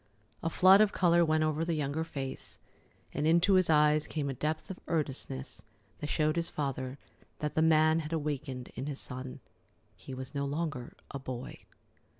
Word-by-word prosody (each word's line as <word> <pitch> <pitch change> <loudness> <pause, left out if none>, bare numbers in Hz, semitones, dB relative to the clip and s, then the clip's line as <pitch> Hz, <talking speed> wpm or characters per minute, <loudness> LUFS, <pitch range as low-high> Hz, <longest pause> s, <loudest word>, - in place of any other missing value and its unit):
A 165 - 0
flood 190 +4 +7
of 215 -2 +3
color 170 -1 +4
went 155 -1 +2
over 155 +1 0
the 165 0 0
younger 150 +1 -1
face, 135 -5 -6 0.6
and 150 - 0
into 170 +4 +4
his 185 -2 +4
eyes 150 -1 +4
came 145 -3 -2
a - - -2
depth 155 +7 -3
of 185 - -8
earnestness 135 -4 -2 0.4
that 150 - -4
showed 155 +1 +1
his 170 0 0
father 135 -2 -3 0.4
that 150 -1 -3
the 160 - +2
man 160 0 +5
had 155 -1 -5
awakened 145 -5 -3
in 130 +3 -5
his 145 -2 -4
son. 130 0 -7 0.5
He 130 - -9
was 130 +1 -7
no 140 -1 -1
longer 145 -3 -3
a 140 - -5
boy. 130 -1 -7
150 Hz, 175 wpm, -31 LUFS, 135-160 Hz, 0.6 s, flood